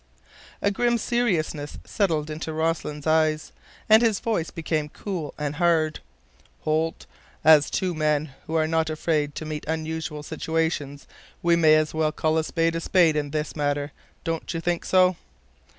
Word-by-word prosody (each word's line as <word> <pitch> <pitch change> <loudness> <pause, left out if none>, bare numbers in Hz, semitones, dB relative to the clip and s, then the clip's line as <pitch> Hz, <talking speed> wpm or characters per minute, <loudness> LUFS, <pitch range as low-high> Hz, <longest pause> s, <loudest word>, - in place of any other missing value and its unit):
A 200 - +3
grim 240 +3 +1
seriousness 180 -11 -1
settled 160 -7 0
in 155 - -5
Rossland's 155 -2 -2
eyes, 155 -1 +2 0.4
and 220 +1 +7
his 225 -4 +2
voice 215 -8 -1
became 155 -2 -2
cool 175 -4 -5
and 150 -1 -3
hard. 165 -3 +2 0.6
"Holt, 160 +1 -1 0.4
as 155 -1 +6
two 185 -2 -1
men 155 -2 0
who 160 - -3
are 160 -1 +3
not 160 0 +1
afraid 155 -2 -1
to 155 - -5
meet 155 -1 -5
unusual 160 -1 -3
situations, 160 -3 -2 0.4
we 170 0 +4
may 160 -2 +6
as 155 0 +1
well 155 -1 +1
call 155 +1 +1
a - - 0
spade 165 +1 0
a 165 - -2
spade 170 -3 +3
in 145 -1 -1
this 150 +1 -3
matter, 145 -1 -1 0.3
don't 165 -2 -3
you - - -1
think 175 +1 -1
so?" 185 -1 +4
160 Hz, 160 wpm, -25 LUFS, 155-165 Hz, 0.6 s, and